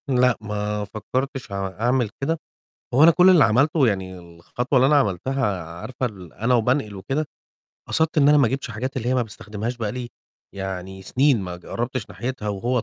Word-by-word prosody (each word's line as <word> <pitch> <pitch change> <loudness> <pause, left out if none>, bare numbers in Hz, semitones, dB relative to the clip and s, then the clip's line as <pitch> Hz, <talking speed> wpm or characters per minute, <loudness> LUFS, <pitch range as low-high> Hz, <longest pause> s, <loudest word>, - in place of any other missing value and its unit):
لأ، 125 -2 +3
ما 105 0 -3
فكّرتش 125 +5 -4
عو 100 -1 -2
أعمل 120 +4 0
كده. 160 +4 0 0.6
هو 140 - +5
أنا 165 - +9
كل 180 +3 +6
اللي 170 -6 +7
عملته 140 +5 +3
يعني 95 -4 -2
الخطوة 90 +10 -2
اللي 130 - +5
أنا 150 +2 +4
عملتها 105 -3 0 0.2
عارفة 130 +4 -3
ال 95 -8 -9
أنا 115 +4 +1
وبانقل 120 -2 +1
وكده، 135 +11 -2 0.6
قصدت 160 0 +2
إن 140 -1 +5
أنا 150 0 +6
ما 135 -5 +4
جِبتش 135 +1 -3
الحاجات 125 +5 -4
اللي 120 -2 -2
هي 130 - +2
ما 125 - +2
باستخدمهاش 110 +2 -5
بقى 110 -3 -3
لي 125 -1 -5 0.5
يعني 95 -1 -6
سِنين 130 +4 +2
ما 90 -2 -5
جرّبتش 120 +5 -4
ناحيتها 120 -3 -4
وهوّة 115 +4 -1
120 Hz, 185 wpm, -23 LUFS, 100-135 Hz, 0.6 s, أنا